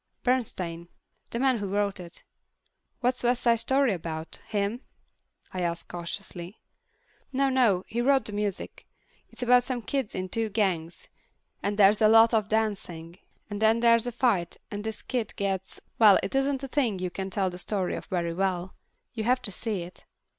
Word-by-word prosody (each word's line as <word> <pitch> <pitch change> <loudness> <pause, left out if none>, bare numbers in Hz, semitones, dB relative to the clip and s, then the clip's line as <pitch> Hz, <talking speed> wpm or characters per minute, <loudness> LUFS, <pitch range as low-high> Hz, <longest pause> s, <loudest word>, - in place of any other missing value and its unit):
"Bernstein. 185 -9 -1 0.4
The - - -3
man 260 -1 +2
who 200 - -3
wrote 200 0 0
it." 170 -2 -10 0.8
"What's 250 0 +1
West 245 0 +2
Side 235 -1 +4
Story 265 0 +2
about, 160 -2 -5
him?" 210 +3 -1 0.7
I 185 - -3
ask 170 -1 -2
cautiously. 175 +2 -6 0.7
"No, 275 +1 +2
no—he 235 -3 +2
wrote 270 +2 +3
the - - -1
music. 205 -2 -4 0.4
It's - - -7
about 245 0 +6
some 245 -2 -3
kids 270 -4 -2
in 185 0 -2
two 225 +4 -1
gangs, 185 -6 -1 0.5
and 205 +1 -1
there's 205 +1 +6
a 215 - +7
lot 225 +2 +7
of 215 -2 +2
dancing, 190 -6 -2 0.3
and 205 0 -5
then 220 +1 +4
there's 230 0 +5
a - - -1
fight 220 -8 +1
and 205 0 -4
this 220 -1 -5
kid 240 -5 -3
gets—well, 195 +2 +2
it 190 - -3
isn't 270 0 +1
a - - -3
thing 255 -7 0
you 180 -1 -3
can 190 +2 -4
tell 190 -1 0
the 180 - -8
story 190 -1 -1
of - - -7
very 170 -3 -2
well. 185 0 -1 0.4
You 220 -2 -3
have 250 +1 +2
to 205 - -1
see 200 -2 -3
it." 175 +2 -12
210 Hz, 175 wpm, -27 LUFS, 185-240 Hz, 0.8 s, a